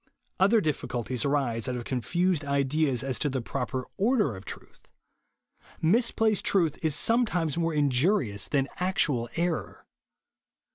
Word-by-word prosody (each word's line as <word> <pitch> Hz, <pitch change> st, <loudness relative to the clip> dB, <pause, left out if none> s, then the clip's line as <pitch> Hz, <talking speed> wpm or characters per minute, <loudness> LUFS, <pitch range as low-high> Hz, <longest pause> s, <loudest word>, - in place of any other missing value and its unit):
Other 205 Hz, +4 st, +4 dB
difficulties 125 Hz, -, -2 dB
arise 135 Hz, -6 st, 0 dB
out 125 Hz, -, -2 dB
of 120 Hz, -1 st, -5 dB
confused 170 Hz, -, 0 dB
JESUS 145 Hz, -, -9 dB
ONLY. 140 Hz, 0 st, +2 dB
189 150 Hz, +3 st, +1 dB
ideas 125 Hz, -3 st, -2 dB
as 130 Hz, -3 st, -2 dB
to 145 Hz, -, 0 dB
the 135 Hz, -1 st, -2 dB
proper 130 Hz, 0 st, -3 dB
order 210 Hz, -, +2 dB
of 95 Hz, +1 st, -11 dB
truth. -, -, -10 dB, 0.9 s
Misplaced 220 Hz, +3 st, +2 dB
truth 170 Hz, -6 st, +1 dB
is 155 Hz, -3 st, +1 dB
sometimes 180 Hz, -, +1 dB
more 165 Hz, -1 st, 0 dB
injuri 145 Hz, -, +2 dB
ous 100 Hz, -, -2 dB
than 135 Hz, -2 st, +1 dB
actual 150 Hz, -10 st, 0 dB
error. 170 Hz, -1 st, -2 dB
150 Hz, 150 wpm, -27 LUFS, 130-180 Hz, 0.9 s, Other